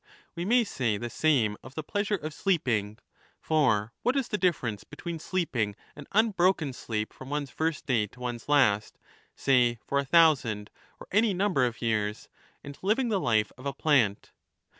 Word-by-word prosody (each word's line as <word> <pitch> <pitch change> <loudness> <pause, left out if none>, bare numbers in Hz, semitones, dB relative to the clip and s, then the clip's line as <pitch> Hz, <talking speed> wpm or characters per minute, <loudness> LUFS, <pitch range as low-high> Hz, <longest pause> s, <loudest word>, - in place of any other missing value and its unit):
We 170 +1 -4
may 240 +4 +4
say 125 - -1
the 120 +2 -5
same 120 -8 +2
of 130 +1 -13
the 155 - -4
pleasure 205 +6 -1
of 155 -4 -6
sleeping. 120 - 0 0.4
For 120 -8 +1
what 250 - +1
is 270 - -1
the 210 - -1
difference 120 - 0
between 165 +2 -7
sleeping 130 - -1 0.2
an 145 -1 -11
unbroken 185 - +2
sleep 110 -3 -4
from 130 - -11
one's 145 -1 -3
first 160 -1 -2
day 115 -6 +1
to 125 - -19
one's 120 +1 -5
last, 110 -8 +3 0.4
say 125 -3 +3
for 140 - 0
a - - 0
thousand 135 -9 +3 0.3
or - - -11
any 205 0 +3
number 180 -10 +2
of 120 0 -7
years, 105 -2 -1 0.3
and 140 0 -10
living 225 +6 +1
the 205 -3 +1
life 110 - +1
of 135 - -6
a 140 - -2
plant 130 -9 +1
140 Hz, 175 wpm, -28 LUFS, 115-175 Hz, 0.4 s, may